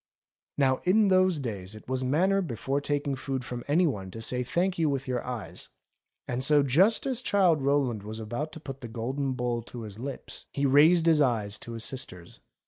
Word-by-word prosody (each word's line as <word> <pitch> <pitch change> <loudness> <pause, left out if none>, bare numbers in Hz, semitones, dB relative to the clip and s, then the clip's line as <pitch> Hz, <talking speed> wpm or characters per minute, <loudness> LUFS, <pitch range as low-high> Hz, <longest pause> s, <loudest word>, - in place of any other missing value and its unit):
Now 130 -2 +3
in 200 +3 +4
those 185 -2 +4
days 105 -7 -5
it 110 - -13
was 130 0 -2
manners 185 +9 +2
before 135 +1 -2
taking 145 -1 -1
food 130 -1 -4
from 120 -1 -6
any 165 +5 +3
one 100 - -2
to 110 - -9
say 125 +2 -1
thank 175 +8 -1
you 160 -2 +3
with 135 -1 -2
your 125 -1 -2
eyes, 125 -3 -6 0.6
and 125 +1 -2
so 145 +1 +5
just 180 - +3
as 255 -3 0
Childe 185 - +3
Rowland 135 -5 +1
was 110 +2 -7
about 120 +8 -4
to - - -8
put 135 -3 -8
the 120 - -6
golden 130 +4 -3
bowl 120 -1 -2
to 115 0 -9
his 105 -1 -9
lips, 135 +1 -7
he 140 - -1
raised 155 +5 +5
his 160 -2 +5
eyes 110 -6 0
to 120 - -7
his 115 -1 -4
sister's. 90 -10 -5
135 Hz, 205 wpm, -28 LUFS, 120-155 Hz, 0.6 s, so